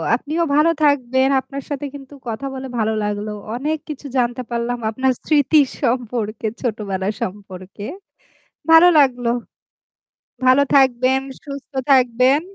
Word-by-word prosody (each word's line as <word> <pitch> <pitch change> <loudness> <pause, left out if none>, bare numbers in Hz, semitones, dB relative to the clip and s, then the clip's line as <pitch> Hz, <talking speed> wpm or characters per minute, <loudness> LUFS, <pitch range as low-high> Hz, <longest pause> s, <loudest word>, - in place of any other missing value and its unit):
আপনিও 310 +7 -2
ভালো 305 +3 +4
থাকবেন। 265 -2 +2
আপনার 275 +1 -7
সাথে 285 -1 -4
কিন্তু 275 0 -11
কথা 230 +4 -4
বলে 265 0 -6
ভালো 220 0 +1
লাগলো। 210 +1 -3 0.2
অনেক 300 +5 -1
কিছু 295 -1 -7
জানতে 245 0 0
পারলাম 235 +1 -1
আপনার 260 +4 +1
স্মৃতির 290 -1 +4
সম্পর্কে 235 -3 -1
ছোটবেলা 200 -6 -3
সম্পর্কে। 190 0 -7 0.9
ভালো 325 +2 +8
লাগলো। 250 -4 +3 1.1
ভালো 255 +2 +5
থাকবেন, 260 -1 +4 0.2
সুস্থ 280 -1 -9 0.2
থাকবেন। 255 +2 +4
255 Hz, 120 wpm, -20 LUFS, 230-280 Hz, 1.1 s, ভালো